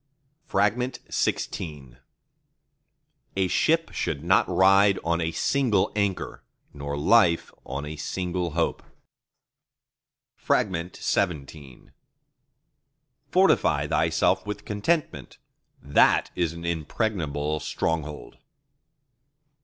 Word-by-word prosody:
XVI 95 - -2 1.4
A 95 -1 +2
ship 165 - +1
should 70 - -3
not 95 +3 +3
ride 95 +2 +5
on 85 0 0
a 80 - 0
single 120 -3 +1
anchor, 100 -3 -2 0.3
nor 70 0 -5
life 85 +2 +3 0.2
on 70 +2 -4
a 75 +1 -6
single 90 +2 -3
hope. 85 - 0 1.6
XVII 85 -6 -2 1.4
Fortify - - +3
thyself - - +1
with 105 - -5
contentment: 140 +10 -2 0.5
that 70 0 +3
is 85 -2 0
an 85 0 -8
impregnable 80 -3 -2
stronghold. 75 -2 -3
85 Hz, 80 wpm, -25 LUFS, 75-100 Hz, 1.6 s, ride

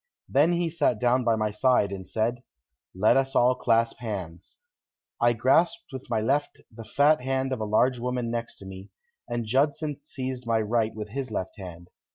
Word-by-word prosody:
Then 150 +6 +3
he 170 -1 0
sat 125 -8 +1
down 125 +2 +2
by 115 -1 +2
my 110 -1 -1
side 105 -2 +2
and 95 -2 -7
said: 115 +2 -1 0.5
"Let 105 +7 +4
us 135 0 0
all 125 +1 +5
clasp 115 -2 +1
hands." 95 -7 -7 0.6
I 120 0 +4
grasped 155 - +1
with 130 -1 -8
my 115 -2 +1
left 140 +6 -1
the 115 0 -10
fat 145 +6 +3
hand 130 +1 -1
of 130 - -4
a - - -1
large 120 +4 +2
woman 125 -1 -2
next 115 0 -4
to 95 - -13
me, 95 +1 -10 0.4
and 120 -1 -2
Judson 145 +4 0
seized 130 -4 -6
my 115 -1 +2
right 110 0 0
with 105 -1 -6
his 135 +3 -4
left 95 -4 -4
hand. 85 -2 -10
120 Hz, 190 wpm, -26 LUFS, 110-130 Hz, 0.6 s, all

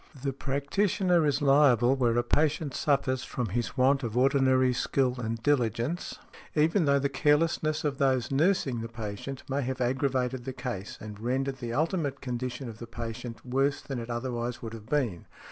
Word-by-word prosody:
The 135 +1 -2
practitioner 165 +5 +1
is 145 0 0
liable 135 -3 +5
where 120 -3 +1
a 120 - +3
patient 150 -1 +1
suffers 135 -3 +1
from 125 -5 -3
his 120 +4 -2
want 135 +2 +4
of 120 -2 -3
ordinary 130 -1 +4
skill 125 +1 0
and 115 -1 -3
diligence, 130 - 0 0.4
even 160 +4 +3
though 140 0 +4
the 140 0 +1
carelessness 155 +2 +1
of 145 -3 -1
those 130 -2 +2
nursing 140 -5 +2
the 115 - -5
patient 115 +3 -6
may 140 +1 -1
have 130 0 -3
aggravated 130 0 0
the 130 - -5
case 125 -6 -5
and 105 -1 -9
rendered 130 +4 -1
the 120 -3 -5
ultimate 150 -1 0
condition 125 0 -4
of 115 -1 -9
the 120 - -7
patient 115 0 -7
worse 135 +3 +1
than 135 -3 -5
it 115 0 -7
otherwise 120 0 -3
would 115 -1 -7
have 110 -1 -10
been. 120 - -1
130 Hz, 175 wpm, -28 LUFS, 120-140 Hz, 0.4 s, liable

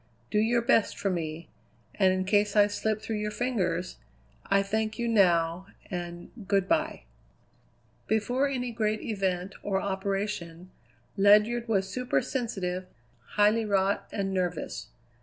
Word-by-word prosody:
Do 210 - +2
your 235 +2 +2
best 225 -2 +3
for 195 - 0
me, 160 -2 -4 0.5
and 190 -2 +3
in 185 0 0
case 205 +1 +2
I 205 -1 +7
slip 215 +1 -2
through 220 - -2
your 210 0 -2
fingers 185 -7 -1 0.5
I 195 0 +3
thank 215 +2 -1
you 235 -1 -1
now, 175 -4 +3 0.2
and 175 -1 -6 0.2
good 195 -2 +2
bye." - - 0 1.0
Before 245 +6 +1
any 250 -3 -2
great 215 -2 -1
event, 190 -3 -2
or 195 -1 0
operation, 190 -3 -3 0.5
Ledyard 210 +4 +5
was 195 -4 +1
supersensitive, 220 -7 -2 0.5
highly 210 +2 +4
wrought, 200 -1 +1
and 195 -1 -2
nervous. 180 -2 -2
200 Hz, 130 wpm, -28 LUFS, 185-220 Hz, 1.0 s, I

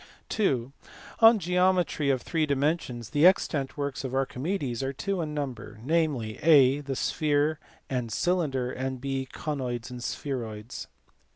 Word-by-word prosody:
(ii) 130 - +1 0.5
On 225 0 +8
geometry 180 -4 +2
of 130 -2 +1
three 160 -2 0
dimensions 140 -5 -1
the 145 - +2
extant 155 -7 +3
works 140 -2 -3
of 130 -1 -3
Archimedes 135 -1 -2
are 135 0 -1
two 190 +7 -2
in 150 -2 -4
number, 120 -7 -5
namely, 145 -8 0
(a) 140 -3 +6
the 140 -2 -4
Sphere 150 +2 +1 0.3
and 125 -3 -2
Cylinder, 145 -8 0
and 130 0 -3
(b) 135 0 -3
Conoids 125 -5 -4
and 125 - -6
Spheroids. 115 -5 -5
140 Hz, 135 wpm, -27 LUFS, 125-155 Hz, 0.5 s, On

